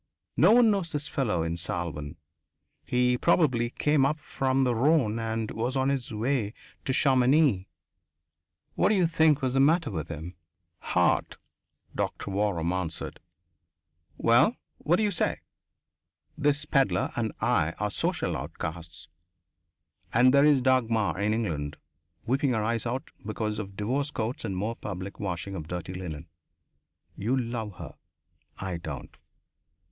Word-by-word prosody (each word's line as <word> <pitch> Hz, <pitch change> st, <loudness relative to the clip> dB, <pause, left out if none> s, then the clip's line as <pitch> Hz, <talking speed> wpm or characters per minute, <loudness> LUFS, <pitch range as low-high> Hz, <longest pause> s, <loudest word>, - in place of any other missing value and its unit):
No 175 Hz, -, +6 dB
one 235 Hz, -2 st, +6 dB
knows 190 Hz, -5 st, -1 dB
this 145 Hz, 0 st, -2 dB
fellow 105 Hz, -12 st, 0 dB
in 85 Hz, +1 st, -2 dB
Salvan 85 Hz, -4 st, -4 dB, 0.7 s
he 125 Hz, +7 st, +1 dB
probably 130 Hz, -9 st, +3 dB
came 150 Hz, +2 st, +2 dB
up 145 Hz, +3 st, +2 dB
from 135 Hz, -2 st, 0 dB
the 125 Hz, -2 st, +2 dB
Rhone 120 Hz, -3 st, +2 dB
and 115 Hz, -1 st, -2 dB
was 120 Hz, +4 st, -2 dB
on 130 Hz, +1 st, +2 dB
his 135 Hz, -3 st, -2 dB
way 115 Hz, 0 st, -1 dB, 0.3 s
to -, -, 0 dB
Chamonix. 130 Hz, -5 st, +3 dB, 1.1 s
What -, -, +2 dB
d'you 195 Hz, -4 st, +3 dB
think 160 Hz, -3 st, +3 dB
was 130 Hz, -1 st, +1 dB
the 135 Hz, -, +2 dB
matter 155 Hz, +2 st, +3 dB
with 80 Hz, -4 st, -4 dB
him?" 85 Hz, +2 st, -7 dB, 0.5 s
"Heart," -, -, +1 dB, 0.6 s
Doctor 100 Hz, -, -3 dB
Waram 95 Hz, -4 st, 0 dB
answered. 90 Hz, -3 st, -4 dB, 1.0 s
"Well, 120 Hz, -, +4 dB, 0.2 s
what 170 Hz, -, +2 dB
d'you 210 Hz, +2 st, +1 dB
say? 175 Hz, -, -1 dB, 0.9 s
This 145 Hz, +1 st, +1 dB
pedlar 135 Hz, -2 st, +2 dB
and 110 Hz, -2 st, -1 dB
I 85 Hz, -9 st, +1 dB
are 105 Hz, 0 st, -2 dB
social -, -, -1 dB
outcasts. 80 Hz, -1 st, -6 dB, 1.0 s
And 125 Hz, +3 st, +5 dB
there 140 Hz, +1 st, +6 dB
is 145 Hz, -3 st, +5 dB
Dagmar 115 Hz, -7 st, +2 dB
in 105 Hz, +1 st, +1 dB
England, 80 Hz, -10 st, -2 dB, 0.5 s
weeping 130 Hz, +2 st, +1 dB
her 110 Hz, -2 st, 0 dB
eyes 115 Hz, +1 st, -1 dB
out 130 Hz, +3 st, -4 dB
because 110 Hz, 0 st, -3 dB
of 100 Hz, -2 st, -6 dB
divorce 130 Hz, +7 st, -1 dB
courts 115 Hz, -1 st, -3 dB
and 95 Hz, -3 st, -3 dB
more 110 Hz, +5 st, -2 dB
public 95 Hz, -2 st, -6 dB
washing 95 Hz, -1 st, -4 dB
of 80 Hz, -5 st, -6 dB
dirty 90 Hz, +1 st, -5 dB
linen. 85 Hz, -4 st, -6 dB, 0.9 s
You 120 Hz, +7 st, 0 dB
love 115 Hz, -5 st, -3 dB
her. -, -, -9 dB, 0.6 s
I 95 Hz, -3 st, -4 dB
don't! 80 Hz, -4 st, -7 dB
115 Hz, 140 wpm, -28 LUFS, 95-135 Hz, 1.1 s, No